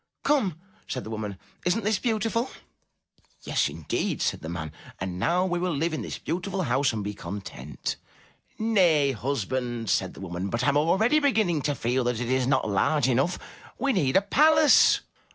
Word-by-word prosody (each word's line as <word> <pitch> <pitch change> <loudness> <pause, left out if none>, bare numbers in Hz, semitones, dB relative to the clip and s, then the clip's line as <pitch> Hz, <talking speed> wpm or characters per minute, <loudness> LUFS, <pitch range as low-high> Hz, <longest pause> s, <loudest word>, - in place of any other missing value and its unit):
'*Come,'* 215 - +1 0.3
said 125 - -4
the 110 - -8
woman, 105 -3 -4 0.3
*'isn't 200 +5 +1
this 210 0 +1
beautiful?'* 230 +1 0 1.0
''Yes, - - +1
indeed,'* 80 -3 -2
said - - -1
the 80 - -6
man, 80 -3 -5 0.3
''and 90 -1 -4
now 180 - +2
we 175 -1 -1
will 180 -3 -1
live 160 +3 0
in 155 - -2
this - - -5
beautiful 185 +3 -3
house 140 -2 +2
and 110 -2 -3
be 105 +1 -3
content. 85 -9 -6 0.6
"Nay, 175 -11 +3
husband, 120 -2 -2
said 95 - 0
the - - -11
woman, 90 +1 -4
"but 115 - -1
I - - +3
am 140 - +2
already 195 - +3
beginning 220 - +2
to 145 - 0
feel 125 +2 0
that 120 -2 0
it 120 0 -2
is 130 -1 +1
not 135 -4 +2
large 125 +8 +2
enough. 135 +8 +1 0.4
We 275 +2 +1
need 145 - +2
a 195 - +3
palace. 310 +5 +5
140 Hz, 180 wpm, -26 LUFS, -, 1.0 s, palace